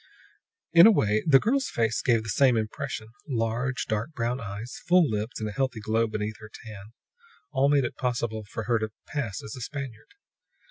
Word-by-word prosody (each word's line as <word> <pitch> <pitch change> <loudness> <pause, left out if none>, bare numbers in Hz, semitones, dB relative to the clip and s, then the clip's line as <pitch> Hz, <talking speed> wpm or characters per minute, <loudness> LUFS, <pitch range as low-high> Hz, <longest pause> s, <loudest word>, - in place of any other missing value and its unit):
In 170 +4 +10
a - - +8
way, 110 - +2
the 135 -3 +7
girl's 265 - +1
face 110 -2 0
gave 115 -3 +2
the 110 - -7
same 125 +3 +4
impression. 110 +1 -4 0.2
Large, 120 +1 -1
dark 110 +8 -2
brown 120 -1 -1
eyes, 105 +3 -7
full 175 -2 +5
lips 110 0 -3
and 110 - -2
a - - -4
healthy 130 +1 -1
glow 110 +2 +1
beneath 110 0 -4
her 110 -1 -11
tan, 105 -1 -11 0.6
all 140 -1 +3
made 140 -3 +3
it - - -5
possible 120 -3 -2
for 115 - -4
her 115 +1 +1
to 110 0 -2 0.2
pass 130 -10 -4
as 110 - -7
a 125 - -8
Spaniard. 135 - -7
115 Hz, 190 wpm, -27 LUFS, 110-135 Hz, 0.6 s, In